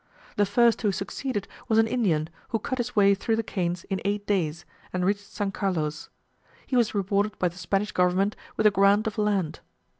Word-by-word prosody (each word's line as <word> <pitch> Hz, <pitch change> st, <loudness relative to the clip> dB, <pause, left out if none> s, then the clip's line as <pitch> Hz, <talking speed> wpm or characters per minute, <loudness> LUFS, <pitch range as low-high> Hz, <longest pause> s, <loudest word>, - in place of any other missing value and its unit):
The 205 Hz, -1 st, +2 dB
first 235 Hz, +3 st, +3 dB
who 210 Hz, -3 st, +2 dB
succeeded 200 Hz, +2 st, -3 dB, 0.2 s
was 220 Hz, -, +2 dB
an 225 Hz, -, +6 dB
Indian, 190 Hz, -10 st, +1 dB, 0.2 s
who 225 Hz, -, +1 dB
cut 260 Hz, +4 st, -4 dB
his 245 Hz, +1 st, -3 dB
way 200 Hz, -1 st, +6 dB
through 220 Hz, +3 st, 0 dB
the 225 Hz, -, -1 dB
canes 175 Hz, -4 st, -2 dB
in 195 Hz, -2 st, -3 dB
eight 205 Hz, 0 st, -1 dB
days, 170 Hz, -5 st, -1 dB, 0.3 s
and 180 Hz, 0 st, -1 dB
reached 200 Hz, +1 st, -2 dB
S. 200 Hz, -1 st, 0 dB
Carlos: 160 Hz, -7 st, -2 dB, 0.6 s
he 260 Hz, -, -2 dB
was 235 Hz, -3 st, +2 dB
rewarded 200 Hz, +1 st, 0 dB
by 180 Hz, -, +1 dB
the 170 Hz, -, -16 dB
Spanish 195 Hz, +4 st, -1 dB
government 185 Hz, +3 st, +2 dB, 0.2 s
with 220 Hz, -, +1 dB
a 210 Hz, -, +7 dB
grant 200 Hz, +2 st, +4 dB
of 215 Hz, -1 st, -3 dB
land. 200 Hz, -6 st, 0 dB
200 Hz, 200 wpm, -26 LUFS, 185-215 Hz, 0.6 s, a